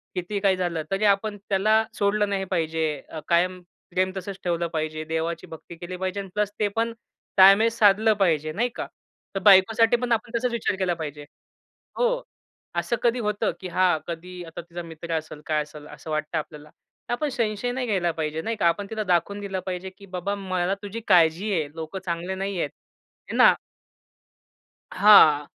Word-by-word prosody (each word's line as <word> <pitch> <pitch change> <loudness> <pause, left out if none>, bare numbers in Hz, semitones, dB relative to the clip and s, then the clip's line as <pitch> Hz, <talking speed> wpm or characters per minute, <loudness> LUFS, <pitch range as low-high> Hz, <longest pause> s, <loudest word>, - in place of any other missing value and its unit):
कितीही 185 +3 -2
काही 195 -2 +3
झालं, 175 -3 -2
तरी 195 +2 0
आपण 205 +1 +2
त्याला 215 +3 +3
सोडलं 205 0 +1
नाही 195 -1 -1
पाहिजे. 160 -2 0 0.2
अ, 160 - -6
कायम 180 +2 +2 0.3
प्रेम 185 +1 +1
तसंच 195 0 -6
ठेवलं 170 -1 0
पाहिजे. 155 0 -2
देवाची 165 +2 -3
भक्ती 165 +1 -11
केली 175 +2 -7
पाहिजे 190 +2 -3
अन् 195 -1 -6
प्लस 210 -1 0
ते 210 - +2
पण 230 0 0 0.4
ताळमेळ 195 +4 +8
साधलं 220 -1 +4
पाहिजे, 155 -5 +2
नाही 235 +10 0
का? - - -4 0.5
तर - - 0
बायकोसाठी 215 +4 +6
पण 245 0 -3
आपण 230 +1 0
तसाच 250 +1 -1
विचार 235 -4 -1
केला 185 -2 0
पाहिजे. 150 -3 -6 0.7
हो, - - +1 0.5
असं 170 +6 0
कधी 240 +1 +2
होतं 210 -2 0
की 185 - -6
हां, 180 -1 +2
कधी 175 +1 -7
आता 165 - -8
तिचा 175 +1 -8
मित्र 165 0 -7
असेल, 155 -1 -7
काय 155 -1 +1
असेल 150 0 -12
असं 160 - -11
वाटतं 155 +1 -2
आपल्याला. 150 -1 -7
तर 240 - -10
आपण 295 +5 -1
संशय 235 -2 -1
नाही 255 0 -2
घ्यायला 185 -5 +1
पाहिजे, 160 -1 -3
नाही 225 +6 -2
का? 175 - +2
आपण 195 +4 0
तिला 220 -1 -2
दाखवून 190 +2 +1
दिलं 195 -2 -3
पाहिजे 185 0 -4
की 200 - -13
बाबा 195 +3 -2
मला 185 -2 -1
तुझी 205 +3 -5
काळजी 170 +5 +4
आहे. 160 -5 0
लोकं 165 +4 -5
चांगले 175 +2 -3
नाहीयेत. 190 -5 -2 0.6
हे - - -4
ना? - - +8 1.4
हां. 160 -8 +7
185 Hz, 180 wpm, -25 LUFS, 165-210 Hz, 1.4 s, ताळमेळ